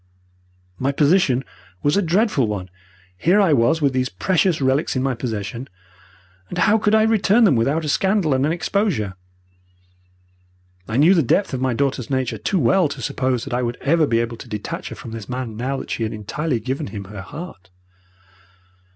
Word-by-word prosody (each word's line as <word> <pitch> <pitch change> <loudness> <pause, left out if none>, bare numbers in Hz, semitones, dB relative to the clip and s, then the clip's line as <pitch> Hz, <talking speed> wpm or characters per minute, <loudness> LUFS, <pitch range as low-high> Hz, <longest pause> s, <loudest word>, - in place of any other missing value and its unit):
"My 135 +2 +1
position 140 -3 +3 0.4
was 145 +1 +2
a 200 - +3
dreadful 180 - +2
one. 95 -4 -4 0.5
Here 180 - +3
I 190 -7 +4
was 140 +5 +2
with 140 -2 +2
these 130 -1 0
precious 175 - +1
relics 135 +2 +1
in 130 - 0
my 135 -1 0
possession, 115 0 -5 0.8
and 175 - -6
how 210 +6 +4
could 215 0 +2
I 220 - +5
return 220 +1 +3
them 195 - +5
without 140 +8 +1
a - - -2
scandal 190 -2 +2
and 130 0 +1
an 150 - +1
exposure? 170 - -1 1.7
I 115 - -2
knew 160 +7 +6
the 170 - +4
depth 155 - +1
of 130 - -2
my 130 -2 0
daughter's 135 -2 -1
nature 130 -5 -1
too 110 - 0
well 155 +5 +3
to - - -7
suppose 130 -3 -1
that 135 - -6
I 125 - +1
would 120 0 -2
ever 155 +2 +2
be 115 - +1
able 115 0 -4
to 120 - -11
detach 105 -2 -5
her - - -7
from 115 - -9
this 115 -1 -8
man 125 -3 -4
now 130 +5 -2
that - - -7
she - - -3
had 110 0 -1
entirely 120 +6 -2
given 135 +6 -3
him 100 -2 -7
her 100 0 -9
heart. 95 - -10
135 Hz, 195 wpm, -21 LUFS, 115-165 Hz, 1.7 s, knew